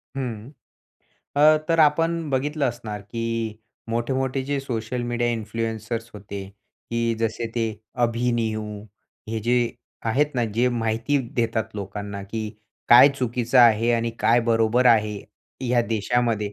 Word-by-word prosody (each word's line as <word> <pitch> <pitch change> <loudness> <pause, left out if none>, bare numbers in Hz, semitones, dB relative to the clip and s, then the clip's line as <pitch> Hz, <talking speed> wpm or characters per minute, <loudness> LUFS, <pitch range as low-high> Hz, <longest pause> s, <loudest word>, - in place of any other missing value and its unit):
हं. 120 -3 -4 0.9
अ, 155 +2 +7
तर 165 0 +2
आपण 165 +1 +2
बघितलं 145 +3 0
असणार, 110 -3 -6
की 115 +1 -3 0.3
मोठे-मोठे 130 +3 -1
जे 140 +1 -1
सोशल 120 -2 -3
मीडिया 120 0 0
इन्फ्लुएन्सर्स 115 +1 -3
होते, 100 -1 -7 0.5
की 115 0 0
जसे 115 +1 -1
ते 115 -1 +1 0.4
अभि-नियू. 115 -2 0 0.6
हे 115 - -2
जे 120 +3 +1 0.5
आहेत 145 +5 +1
ना 120 - +1
जे 125 +2 +3
माहिती 115 +5 0 0.2
देतात 110 -1 -1
लोकांना, 100 0 -5
की 110 +2 -4 0.4
काय 120 +4 +9
चुकीचं 120 0 +1
आहे 115 -1 +6
आणि 115 0 0
काय 120 +1 +4
बरोबर 115 +2 +2
आहे, 110 -3 +4 0.5
ह्या 125 -1 +2
देशामध्ये. 110 -1 0
115 Hz, 125 wpm, -24 LUFS, 110-125 Hz, 0.9 s, काय